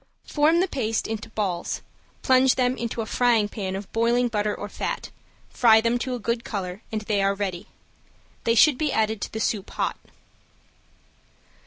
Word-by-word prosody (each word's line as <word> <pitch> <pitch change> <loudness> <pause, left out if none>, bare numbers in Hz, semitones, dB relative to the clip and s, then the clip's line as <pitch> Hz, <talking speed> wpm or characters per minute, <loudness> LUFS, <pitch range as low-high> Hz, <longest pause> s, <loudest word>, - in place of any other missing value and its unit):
Form 315 +3 +3
the 380 - +1
paste 225 - -1
into 220 -1 -5
balls, 195 -6 -3 0.4
plunge 260 0 +4
them 250 0 +1
into 235 -1 -3
a - - -3
frying 230 -2 +2
pan 190 -3 -4
of 195 0 -7
boiling 235 +2 +2
butter 210 -2 -1
or 205 - -6
fat, - - -4 0.4
fry 225 -2 +5
them 230 +2 +1
to 255 0 -2
a - - -5
good 235 +1 -2
color, 190 -2 -5
and 215 -1 -2
they 210 -1 0
are 195 0 +2
ready. 190 -3 -4 0.8
They 230 - +2
should 260 +3 +5
be 305 -2 +1
added 220 -1 0
to - - -4
the 220 - -4
soup 210 -2 -1
hot. - - -2
220 Hz, 175 wpm, -24 LUFS, 205-245 Hz, 0.8 s, fry